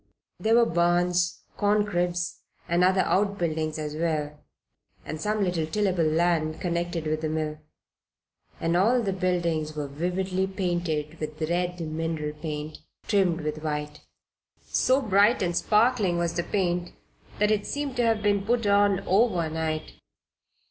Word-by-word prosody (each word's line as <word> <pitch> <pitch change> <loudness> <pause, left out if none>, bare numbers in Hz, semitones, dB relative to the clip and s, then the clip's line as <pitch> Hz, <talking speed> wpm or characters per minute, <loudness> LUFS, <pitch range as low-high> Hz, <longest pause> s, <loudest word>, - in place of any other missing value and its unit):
There 220 +1 +3
were 235 0 +6
barns, 175 0 +1 0.2
corn 205 0 +2
cribs 175 -2 -1 0.3
and 170 +1 +2
other 190 +1 +4
outbuildings 170 -7 0
as 150 -1 -4
well, 155 -2 -2 0.7
and 155 0 -5
some 210 +1 0
little 175 -4 0
tillable 185 0 +1
land 160 0 +1
connected 170 -2 -2
with 155 0 -1
the 155 - -1
mill; 155 -1 -2 1.0
and 165 +1 0
all 230 +7 +3
the 195 -2 -1
buildings 170 -4 -1
were 150 -1 -3
vividly 180 +5 -1
painted 175 -5 -2
with 155 0 -5
red 180 +1 -1
mineral 160 -1 -3
paint, 150 0 -6 0.3
trimmed 185 -5 +2
with 150 0 -4
white. 150 -1 -4 0.6
So 265 +2 +2
bright 205 +1 +4
and 175 -1 -1
sparkling 210 -4 +2
was 170 -1 0
the 175 - 0
paint 175 -3 -1 0.4
that 210 +1 +2
it 210 -1 0
seemed 285 -2 -3
to 245 - +2
have 225 -2 +1
been 205 -1 +2
put 230 +2 0
on 200 -1 +3
over 190 -4 +2
night. 160 -1 -3
175 Hz, 145 wpm, -26 LUFS, 155-200 Hz, 1.0 s, were